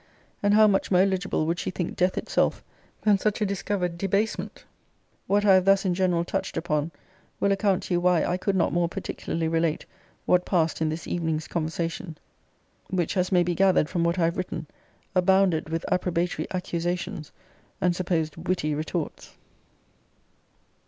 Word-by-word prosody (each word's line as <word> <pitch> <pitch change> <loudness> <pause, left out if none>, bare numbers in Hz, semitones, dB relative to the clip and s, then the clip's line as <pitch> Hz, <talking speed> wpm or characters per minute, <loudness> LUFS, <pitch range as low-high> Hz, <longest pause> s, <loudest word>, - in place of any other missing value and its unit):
and 205 0 +3
how 215 0 +7
much 200 -2 +2
more 180 -1 +4
eligible 190 -4 0
would 170 +2 -1
she - - -2
think 180 -2 -4
death 180 +1 +1
itself - - 0 0.4
than 205 -2 +4
such 210 +1 0
a 210 - +1
discovered 190 -3 -2
debasement! 200 +3 -1 0.6
What 205 +1 +2
I 195 - +7
have 185 -1 +4
thus 195 0 +4
in 185 - +2
general 175 -2 +1
touched 190 +1 -3
upon, 150 -2 -1 0.5
will 200 - +2
account 195 -1 +1
to 185 - -3
you 175 - +3
why 180 -2 +3
I 175 - 0
could 195 +2 -1
not 175 - +1
more 175 0 +1
particularly 170 -3 -3
relate 165 -1 0 0.4
what 180 0 +3
passed 165 -4 0
in 160 - +2
this 160 +2 -4
evening's 160 -2 -2
conversation: 165 0 -3 0.7
which, 180 -1 -1
as 180 0 0
may 180 -2 +4
be 175 0 -1
gathered 185 -4 +3
from 170 - 0
what 170 +1 +1
I 170 - +3
have 170 +1 -1
written, 175 -3 -4 0.5
abounded 185 -3 +3
with 165 +1 -3
approbatory 180 -1 0
accusations, 175 -2 -3 0.5
and 180 -1 +2
supposed 170 -4 -1
witty 165 -3 -1
retorts. 155 +2 -4
180 Hz, 165 wpm, -26 LUFS, 165-190 Hz, 0.7 s, how